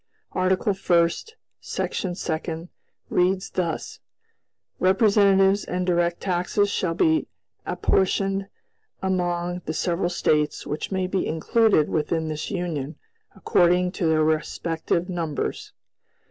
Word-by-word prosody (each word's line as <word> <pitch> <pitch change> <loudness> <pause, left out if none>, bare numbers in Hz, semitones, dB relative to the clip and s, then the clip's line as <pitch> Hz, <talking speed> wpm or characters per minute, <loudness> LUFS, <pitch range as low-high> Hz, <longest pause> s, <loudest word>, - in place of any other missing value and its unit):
"Article 185 +2 +1
First, 175 - +1 0.2
Section 180 -2 -3
Second, 165 0 -4 0.4
reads 185 +1 +1
thus: 170 -3 -3 0.8
'Representatives 195 0 +4
and 180 0 -2
direct 175 -1 +1
taxes 190 +2 0
shall 170 -4 -1
be 320 - +2 0.4
apportioned 195 +1 +1 0.6
among 175 -1 -1
the 155 - -3
several 175 +2 0
States 150 -3 0
which 150 +6 -4
may 190 -1 0
be 185 0 -1
included 180 +1 +2
within 160 +1 -1
this 155 -1 -4
Union, 165 -7 -3 0.4
according 180 -1 +3
to 180 -3 -1
their 155 -1 +3
respective 160 +2 -1
numbers.' 165 -5 -3
180 Hz, 105 wpm, -24 LUFS, 165-190 Hz, 0.8 s, Representatives